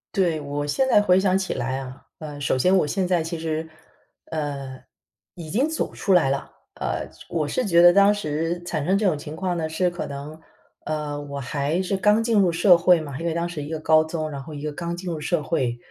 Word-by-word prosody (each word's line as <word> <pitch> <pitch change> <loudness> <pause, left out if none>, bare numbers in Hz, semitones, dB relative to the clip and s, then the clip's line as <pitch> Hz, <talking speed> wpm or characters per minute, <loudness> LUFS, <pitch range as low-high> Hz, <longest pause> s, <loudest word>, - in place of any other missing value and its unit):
对， 175 -5 +2
我 145 0 -3
现 260 - +1
在 210 - +5
回 185 -3 +4
想 190 -1 +2
起 190 -1 -2
来 130 +1 -2
啊。 130 0 -9 0.2
呃， 150 -2 -7
首 140 -2 0
先 185 +9 +4
我 165 - +2
现 185 +5 0
在， 180 -2 +1
其 165 +1 -4
实， 160 0 -3 0.6
呃， 140 -4 -4 0.5
已 165 -3 -9
经 250 - +1
走 320 0 -3
出 195 - 0
来 175 -7 +4
了， 135 0 -2 0.3
呃， - - -3 0.2
我 160 -3 -1
是 255 - -1
觉 170 -4 +5
得 175 - +9
当 200 +2 +5
时 165 -2 -2
产 155 -4 -3
生 190 +4 +3
这 210 - 0
种 175 -6 +2
情 150 +1 -8
况 180 0 -2
呢， 160 -1 -1
是 170 +3 0
可 175 0 -5
能， 145 +3 -8 0.5
呃， 150 -1 -3
我 140 -1 -7
还 145 +7 -1
是 190 +1 -1
刚 210 +3 +3
进 225 -2 +2
入 190 -3 +4
社 175 +2 +5
会 175 -1 +4
嘛， 140 -3 -7
因 165 - -5
为 170 - 0
当 170 +1 -2
时 165 -3 -5
一 145 - -6
个 160 +1 -3
高 155 0 +4
中， 155 -1 -4
然 140 - -6
后 155 +3 -10
一 145 - -7
个 150 - -2
刚 170 +3 -4
进 180 0 -5
入 160 - -4
社 155 +1 -1
会， 130 -6 -1
165 Hz, 255 characters per minute, -23 LUFS, 145-180 Hz, 0.6 s, 得